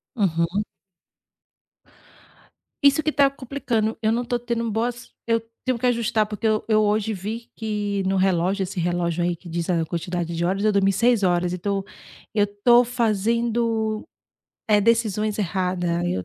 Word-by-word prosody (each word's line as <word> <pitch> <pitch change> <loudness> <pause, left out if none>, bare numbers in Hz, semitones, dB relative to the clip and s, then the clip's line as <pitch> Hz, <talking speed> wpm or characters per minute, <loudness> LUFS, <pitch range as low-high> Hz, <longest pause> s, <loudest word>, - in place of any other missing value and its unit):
Uhum. 180 -1 +1 2.2
Isso 280 +2 +6
que 310 0 -1
tá 280 -2 +4
complicando, 240 -5 -2
eu 220 - +2
não 240 +2 0
tô 240 0 -2
tendo 235 -1 -2
boas 235 +3 -3
eu 230 0 +1 0.2
tenho 255 -2 0
que 250 - 0
ajustar, 230 -2 +1
porque 210 +1 -8
eu 215 0 +1
eu 215 -1 +4
hoje 215 +1 +1
vi 215 +5 -6
que 210 -2 -2
no 195 - +1
relógio, 190 +1 +1
esse 185 -1 -4
relógio 175 0 0
aí 175 0 0
que 175 - -13
diz 170 +1 -3
a 165 -2 +1
quantidade 170 0 -3
de 170 +1 -1
horas, 195 +3 0
eu 215 - +4
dormi 195 -1 +3
6 235 +1 +2
horas, 175 -1 +2
então, 195 +2 -2 0.5
eu 205 -2 +4 0.2
tô 240 0 +7
fazendo, 230 -1 0 0.6
eh, 210 -1 +5
decisões 215 -1 +1
errada. 180 -2 -1
Eu 95 - -1
210 Hz, 160 wpm, -23 LUFS, 180-230 Hz, 2.2 s, tô